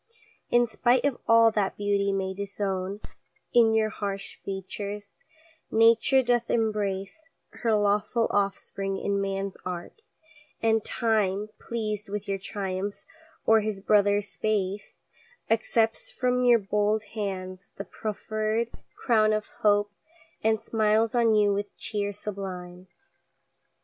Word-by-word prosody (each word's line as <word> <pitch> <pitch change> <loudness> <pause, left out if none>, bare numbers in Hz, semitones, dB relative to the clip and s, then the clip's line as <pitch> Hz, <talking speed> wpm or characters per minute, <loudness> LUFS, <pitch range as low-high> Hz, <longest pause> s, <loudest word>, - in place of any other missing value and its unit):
In 240 0 +4
spite 240 +2 +2
of 280 -4 0
all 230 0 +6
that 205 -3 -1
beauty 200 -1 +1
may 190 -1 -1
disown 195 0 -3 0.5
In 225 -2 +5
your 215 -1 +2
harsh 200 -2 -5
features, 200 +1 -6 0.6
Nature 230 +4 +5
doth 240 -1 +1
embrace 210 +6 -1 0.2
Her 230 -2 0
lawful 210 +3 +2
offspring 195 -1 -1
in 200 0 -1
ManŌĆÖs 195 0 -2
art; 180 - -6 0.6
and 225 -1 +2
Time, 210 -3 0
Pleased 215 -3 -4
with 205 0 -4
your 195 -1 -1
triumphs 195 0 -4 0.4
oŌĆÖer 220 -1 +5
his 215 -2 -2
brother 205 0 +4
Space, 205 -1 -3 0.5
Accepts 225 0 +1
from 250 0 0
your 240 -1 +7
bold 210 +1 0
hands 190 -3 -5
the 200 - -6
profferŌĆÖd 215 +2 -2 0.2
crown 215 -2 +3
Of 215 0 -2
hope, 205 -1 +3 0.5
and 220 0 +2
smiles 220 0 +2
on 230 -2 +4
you 205 -1 +4
with 205 +1 -4
cheer 205 -2 -2
sublime. 185 -3 -7
210 Hz, 120 wpm, -27 LUFS, 195-225 Hz, 0.6 s, your